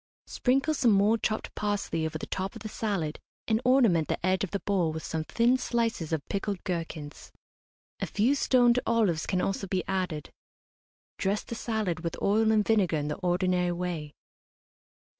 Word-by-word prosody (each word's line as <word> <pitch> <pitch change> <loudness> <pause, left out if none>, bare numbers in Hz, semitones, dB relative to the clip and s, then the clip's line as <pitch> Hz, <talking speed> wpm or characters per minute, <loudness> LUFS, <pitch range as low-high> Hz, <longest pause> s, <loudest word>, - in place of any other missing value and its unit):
Sprinkle 270 +5 +1
some 265 -5 +3
more 205 +3 +4
chopped 215 0 -2
parsley 205 -6 -1
over 155 - -4
the - - -6
top 190 +1 -4
of - - -9
the - - -4
salad 195 -9 -2 0.3
and 220 0 +2
ornament 235 - +4
the - - -2
edge 185 +1 +2
of 195 - -2
the 200 - -3
bowl 185 -5 +1
with 160 0 -5
some 160 -1 -3
thin 240 +9 +2
slices 230 -10 -1
of 155 -3 -2
pickled 200 -1 -3
gherkins. 165 -4 -5 0.7
A - - -2
few 225 +7 +2
stoned 250 -3 +4
olives 210 -9 +2
can 185 -1 +1
also 195 0 -2
be 185 0 -1
added. 185 -6 -2 0.9
Dress 200 +2 0
the - - -7
salad 220 -7 -2
with 165 0 -4
oil 220 +2 +3
and 215 -1 +3
vinegar 200 -7 +2
in 150 0 -2
the 150 - -3
ordinary 180 -1 +1
way. 170 -4 -4
195 Hz, 175 wpm, -28 LUFS, 170-220 Hz, 0.9 s, more